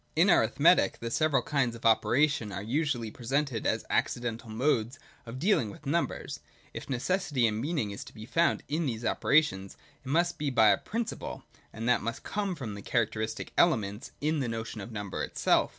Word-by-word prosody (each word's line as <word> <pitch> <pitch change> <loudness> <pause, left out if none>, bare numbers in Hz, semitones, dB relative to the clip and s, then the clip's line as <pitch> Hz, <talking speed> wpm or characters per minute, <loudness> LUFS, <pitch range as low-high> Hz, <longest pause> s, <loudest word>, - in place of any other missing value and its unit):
In - - +5
arithmetic - - +4
the 115 0 -5
several 145 -2 +2
kinds 135 -5 0
of 115 - -11
operation 120 +1 +3
are 95 +1 -5
usually 125 -2 -1
presented 130 0 -1
as - - 0
accidental 120 -1 -1
modes 120 +1 0 0.3
of 115 +2 -6
dealing 155 - +2
with 100 - -12
numbers. 165 +5 -2 0.3
If - - -7
necessity 135 0 0
and 110 0 0
meaning 145 -7 -1
is 100 - -6
to - - -13
be 110 - -8
found 165 +7 +1
in 155 +1 -1
these 115 -2 -3
operations, 115 -13 +1 0.3
it 130 - -8
must 170 +4 +1
be 150 -1 0
by 115 -5 +5
a - - +4
principle: 230 +1 -4 0.3
and 115 +2 -5
that 125 -3 +3
must 115 +2 -4
come 200 -3 -2
from 120 -9 -6
the 100 - -8
characteristic 110 0 -2
elements 105 - +1
in 155 +1 +1
the 130 - -1
notion 115 -1 -5
of 115 - -8
number 105 -3 -4
itself. - - +2
120 Hz, 180 wpm, -29 LUFS, 110-150 Hz, 0.3 s, In